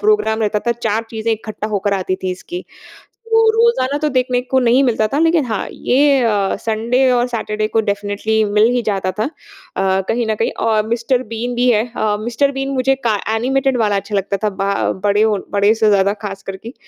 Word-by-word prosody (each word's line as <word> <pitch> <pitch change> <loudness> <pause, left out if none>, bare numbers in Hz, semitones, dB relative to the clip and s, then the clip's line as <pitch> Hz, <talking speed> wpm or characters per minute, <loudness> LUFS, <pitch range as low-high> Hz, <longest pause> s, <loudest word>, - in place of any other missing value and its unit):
Programme 415 - +2
रहता 210 0 +1
था। 235 - +3
4 225 -2 -2
चीज़ें 225 0 -1
इकट्ठा 215 -1 -5
होकर 205 -1 -1
आती 185 -1 -2
थीं 185 - -1
इसकी। 350 - -8 0.6
तो 450 0 +4
रोज़ाना 450 - +2
तो 305 0 0
देखने 255 -2 +1
को 260 +1 0
नहीं 250 +2 +3
मिलता 220 -4 +1
था 275 +7 -1
लेकिन 325 -2 +3
हाँ, 220 -4 -3
ये 275 +1 +2
अ, 205 -4 +1
संडे 235 +4 +1
और 245 0 +2
सैटरडे 215 -3 -2
को 225 +1 +1
डेफ़िनिट्ली 205 +2 0
मिल 210 +2 +4
ही 245 - +1
जाता 195 -4 -1
था - - +2
अ, 290 - -3
कहीं 235 +1 0
न 220 - 0
कहीं 225 - -1
और 215 -1 +2
मिस्टर 235 +2 0
बीन 240 +2 -3
भी 245 +1 +2
है 220 0 +2
अ, 210 -1 0
मिस्टर 240 +5 0
बीन 270 0 -3
मुझे 265 +1 +2
का 220 - +2 0.2
एनिमेटेड 265 +3 +1
वाला 210 -3 +1
अच्छा 200 +1 -3
लगता 200 0 -1
था 210 - +2
बा 200 0 +1
अ, - - 0
बड़े 205 +1 +3
ओ 215 -2 +2
बड़े 205 +1 +3
से 220 -1 +2
ज़्यादा, 200 -1 +3
खासकर 195 -2 -7
कि 225 - -9
अ, - - -12
225 Hz, 215 wpm, -17 LUFS, 210-255 Hz, 0.6 s, तो